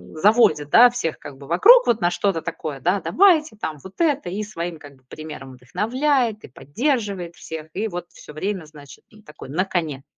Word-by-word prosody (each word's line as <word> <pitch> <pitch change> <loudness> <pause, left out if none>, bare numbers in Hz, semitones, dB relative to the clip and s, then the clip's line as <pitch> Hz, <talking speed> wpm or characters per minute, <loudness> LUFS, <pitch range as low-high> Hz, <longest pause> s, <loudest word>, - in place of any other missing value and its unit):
заводит, 155 -6 +3
да, 245 +9 +8
всех, 200 -10 -3
как 140 -2 -11
бы, 140 - -13
вокруг - - +6
вот 230 - +2
на 175 - +2
что-то 180 -2 -1
такое, 155 -4 -6
да, 185 +5 +1
давайте 325 - +3
там 160 -7 -5
вот 190 0 -13
это. 295 - +1
И 200 +4 -4
своим, 175 -5 -6
как 145 -2 -14
бы 130 - -30
примером 150 -4 -9
вдохновляет, 230 - -1
и - - -10
поддерживает 200 - -3
всех. 160 -1 -8
И 215 +4 -2
вот 175 -3 -6
всё 150 - -14
время, 185 +2 -4
значит, 145 -2 -15 0.2
такой, 150 -3 -12
на 180 +7 0
коне. 160 -8 -3
175 Hz, 190 wpm, -22 LUFS, 155-225 Hz, 0.2 s, да